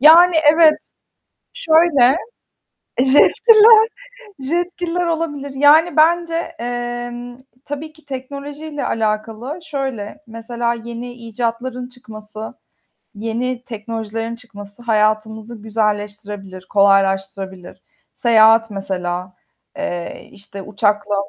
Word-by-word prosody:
Yani, 335 +4 +7 0.2
evet. 315 -2 +3 0.6
Şöyle, 315 - +4 0.8
Jetgiller 440 - +6 0.5
Jetgiller 350 +4 -2
olabilir. 315 -4 -3
Yani 305 +4 +5
bence, 335 +1 +2
eee, 240 0 -5 0.3
tabii 300 +2 -6
ki 315 -1 -22
teknolojiyle 285 +2 -6
alâkalı 225 +6 -2
şöyle, 270 -4 -5
mesela 235 +1 -3
yeni 235 +1 -7
icatların 240 +2 -4
çıkması, 220 -3 -9 0.6
yeni 235 +3 -3
teknolojilerin 225 0 -5
çıkması 205 -2 -12
hayatımızı 220 0 -1
güzelleştirebilir, 205 -3 -3
kolaylaştırabilir. 195 -2 +1 0.3
Seyahat 225 -1 +5
mesela, 185 -2 -4 0.4
eee, 175 -13 -5
işte 200 0 -10
uçakla, 205 0 0
235 Hz, 80 wpm, -19 LUFS, 210-290 Hz, 0.8 s, Yani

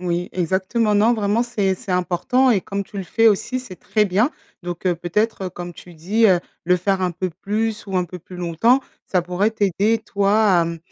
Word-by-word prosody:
Oui, 175 0 -2
exactement. 190 +5 0
Non, 215 +4 +4
vraiment 215 +1 +1
c'est 205 -6 0
c'est 195 -3 -6
important 180 +9 +2
et 205 -5 +3
comme 200 +2 -4
tu 200 +1 -12
le 190 - -3
fais 225 +5 +4
aussi, 245 +5 0
c'est 200 -8 -11
très 210 +5 +1
bien. 210 - +2 0.3
Donc 175 +1 -5
heu, 180 - +3
peut-être, 190 +3 -1
comme 175 -1 -8
tu 175 +2 -13
dis, 205 +8 +2
heu, 180 -4 +4 0.2
le 180 +2 +3
faire 190 +1 0
un 180 - +1
peu 185 +2 -3
plus 215 +1 -2
ou 190 -1 -2
un 180 - +2
peu 180 +1 -9
plus 180 +2 -12
longtemps, 180 +10 +2 0.3
ça 185 - +1
pourrait 180 +4 0
t'aider 210 +1 +1
toi 200 -2 +2
à - - +2
mmh, 165 0 -4
195 Hz, 215 wpm, -21 LUFS, 180-220 Hz, 0.3 s, Non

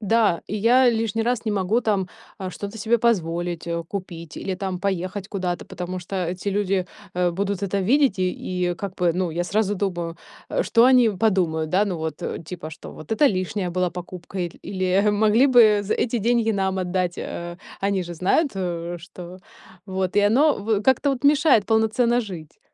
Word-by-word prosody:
Да, 215 -4 +2
и 210 - -3
я 245 +4 +5
лишний 225 -1 -1
раз 240 0 -1
не 215 - +1
могу 205 +4 +1
там, 200 -5 0 0.3
а, 190 -1 -4
что-то 200 +3 -7
себе 230 +3 +2
позволить, 175 -7 0
э, 170 0 -2
купить 170 -5 -7
или 190 - -3
там 185 -1 -4
поехать 190 0 -2
куда-то, 180 -4 -3
потому 180 +1 -5
что 180 0 -3
эти 180 +3 -4
люди, 195 -2 0 0.3
э, 180 -1 +2
будут 200 +2 -2
это 200 0 -1
видеть, 250 -1 +3
и 180 -1 -1
и 175 - -2
как 195 0 -6
бы, 175 -2 +2
ну, 180 -2 -1
я 175 +2 -2
сразу 205 +2 0
думаю, 175 -4 -3 0.3
э: - - +1
что 230 0 +4
они 250 -2 +6
подумают?- 180 -6 0
Да, 190 +3 +3
ну 185 -3 -2
вот, 160 -2 -4
э, - - -4
типа, 160 -1 -7
что: 160 - -10
вот 155 +7 -7
это 290 +7 +4
лишняя 185 -3 -1
была 180 +1 0
покупка,- 180 +2 -8
иль 175 -2 -4
или: 185 +1 +1
могли 215 +5 +4
бы 225 -6 +6
з 200 - -1
эти 240 0 0
деньги 230 +1 +2
нам 190 -1 0
отдать. 180 -1 -1
Э, 175 0 -6 0.2
они 195 -1 0
же 175 0 -7
знают, 195 - +2
э, 175 -2 -3
что 180 +1 -10 0.5
Вот 190 -1 -2
и - - +6
оно 255 +9 +4
в 205 0 0
как-то 265 +4 +3
вот 270 0 -4
мешает 285 -7 +4
полноценно 225 +2 +2
жить. 175 -9 -9
190 Hz, 195 wpm, -23 LUFS, 180-220 Hz, 0.5 s, они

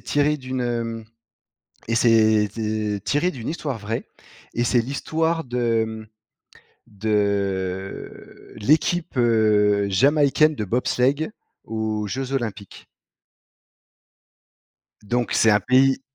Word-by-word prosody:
tiré 145 +1 +1
d'une, 130 -1 -5
hem 115 -2 -3 0.8
et 115 - 0
c'est 110 -3 +4
c 110 -2 -2
tiré 160 +6 +1
d'une 120 -5 -7
histoire 150 -5 -3
vraie 110 +2 -4 0.5
et 120 - 0
c'est 120 0 +3
l'histoire 160 +6 -1
de, 120 -2 0
mmh, 110 0 -8 0.8
de 100 -2 -3
l'équipe, 155 - +1
heu, 105 -4 +3
jamaïcaine 145 +8 +3
de 105 - -3
bobsleigh 125 - 0 0.3
aux 110 -1 -3
Jeux 130 +5 -4
Olympiques. 110 -6 -5 2.2
Donc 120 +3 -1
c'est 110 - +4
un 105 0 +4
pays 130 +1 +3
115 Hz, 105 wpm, -23 LUFS, 105-135 Hz, 2.2 s, c'est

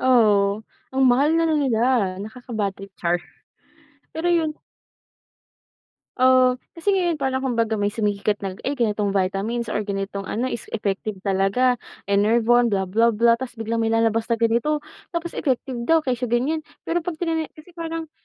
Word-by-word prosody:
Oo, 215 -4 +3 0.3
ang 265 - +2
mahal 275 +6 +4
na 330 - +3
na 320 -1 +2
nila, 245 -6 +1 0.4
nakaka-bad 220 -3 -4
trip, 195 0 -12
char. 175 0 0 0.9
Pero 330 +2 -1
'yun 325 -3 +2 1.7
Oh, 255 0 +5 0.2
kasi 335 +4 0
ngayon 360 -4 +2
parang 265 -3 -1
kumbaga 230 -3 0
may 205 0 0
sumikat 205 -1 0
na 195 - -2 0.2
ay 285 - 0
ganitong 210 -5 0
vitamins 200 +5 -1
or 210 -1 -2
ganitong 195 0 -3
ano, 250 +6 -2
is 235 - -5
effective 210 0 -2
talaga. 200 +6 +2 0.3
Enervon, 230 +4 +4
blah 195 -4 -1
blah 230 +3 +3
blah 230 +2 +4
tapos 255 -2 -6
biglang 225 0 -3
may 225 - +1
lalabas 225 0 +2
na 235 - +1
ganito, 235 +7 +1 0.3
tapos 340 0 -2
effective 260 -2 -2
daw 325 -1 +4
kesyo 250 -2 -1
ganyan. 255 +7 +1 0.2
Pero 335 0 -2
'pag 355 - -2
tinani 325 -2 0
kasi 310 +3 -15
parang 330 -2 -5
235 Hz, 160 wpm, -23 LUFS, 210-275 Hz, 1.7 s, Oh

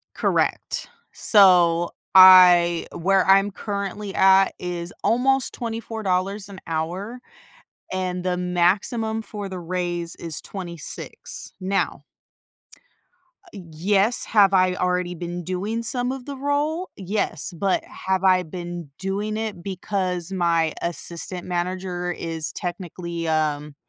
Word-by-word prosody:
Correct. - - -1 0.2
So 175 -4 +5 0.2
I 180 -2 +8
where 190 +2 +2
I'm 195 +1 +5
currently 200 0 -5
at 195 0 +5
is 175 -1 -5
almost 265 +3 +2
$24 210 -4 -3
an 190 -1 -10
hour, 180 +9 -3 0.7
and 185 -1 -2
the 180 -1 -1
maximum 200 +6 0
for 205 -1 -7
the 185 -1 -6
raise 175 -1 -3
is 165 -3 -5
26, 175 -5 -7
now 195 +1 -1 1.4
Ah - - -24
yes, 195 +5 +1
have 200 -3 +4
I 185 -1 +4
already 180 -1 -1
been 175 +1 -5
doing 205 +6 -3
some 245 +1 0
of 265 -2 -6
the 285 -1 -6
role? 290 +6 -1
Yes, 190 -5 -2
but 195 +2 0
have 190 0 -3
I 185 -1 +4
been 175 -2 -7
doing 205 +3 -2
it 215 -5 -4
because 185 -2 -3
my 170 -3 +1
assistant 170 +2 -4
manager 180 0 -3
is 165 -2 -4
technically, 170 -1 -5
um, 150 -2 -1
185 Hz, 115 wpm, -23 LUFS, 175-200 Hz, 1.4 s, I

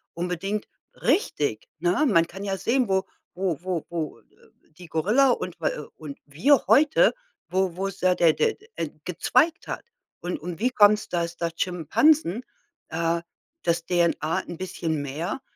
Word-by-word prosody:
unbedingt 180 +4 -3 0.3
richtig, 145 - 0
ne? 175 - +1
Man 170 -8 +4
kann 190 +4 -9
ja 195 -1 -2
sehen, 235 +6 +1
wo 190 -1 +1 0.3
wo 180 -4 -1
wo 180 -3 -3
wo, 165 -3 -4
äh, - - -33 0.5
die 175 +3 -13
Gorilla 210 - +3
und 180 -8 -2
w - - -4
äh, 150 - -3
und 150 -3 -9
wir 210 - +3
heute, 310 - +5 0.3
wo 185 -1 0
wo 190 +2 -2
ist 195 -1 -5
da 185 0 +4
der 165 -3 +5
der 450 - +1
der, 435 - -22
äh, - - -2
gezweigt 325 0 +1
hat. - - -5 0.4
Und 175 +1 -3
und 170 +1 -6
wie 250 +3 +1
kommt's, 210 -2 +5
dass 170 -1 -2
da 170 -1 -1
Schimpansen, 185 - +2 0.5
äh 165 +1 0 0.4
dass 170 0 0
DNA 170 -3 +1
'n 175 - -7
bisschen 165 -4 -3
mehr 160 - -4
180 Hz, 165 wpm, -25 LUFS, 165-205 Hz, 0.5 s, heute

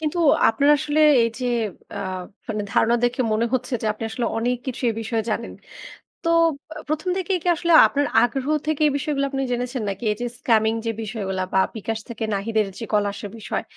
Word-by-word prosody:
কিন্তু 315 +2 -2 0.3
আপনার 280 +5 +2
আসলে 300 +1 0 0.2
এই 230 - +2
যে, - - -2 0.5
আ - - -3 0.5
মানে 215 -2 -2
ধারণা 235 - +3
দেখে 245 +2 0
মনে 220 +2 +1
হচ্ছে 255 +1 -2
যে, - - -1
আপনি 215 +2 -7
আসলে 235 +2 -2
অনেক 245 +2 0
কিছু 260 0 -4
এই 225 - 0
বিষয়ে 225 0 -1
জানেন। 230 +2 -3 0.7
তো 335 - -1 0.6
১ম 310 +4 -2
থেকেই 375 0 0
কি 355 - -1
আসলে 340 0 0
আপনার 285 0 0 0.2
আগ্রহ 255 +2 0 0.2
থেকে 310 -1 -1
এই 295 - +2
বিষয়গুলো 285 -1 -1
আপনি 270 0 -2
জেনেছেন? 245 0 -2
নাকি 195 +3 -4
এই - - -5
যে, 245 - -1
scamming 220 -1 +2
যে, 230 - +1
বিষয়গুলো 195 -4 -3
বা - - +4 0.2
বিকাশ 220 +1 -3
থেকে 230 -1 -4
নাহিদের 215 +1 0
যে, 230 - -5
কল 210 -1 +3
আসা 205 - -7
বিষয়, 205 -3 -3
240 Hz, 195 wpm, -23 LUFS, 220-280 Hz, 0.7 s, বা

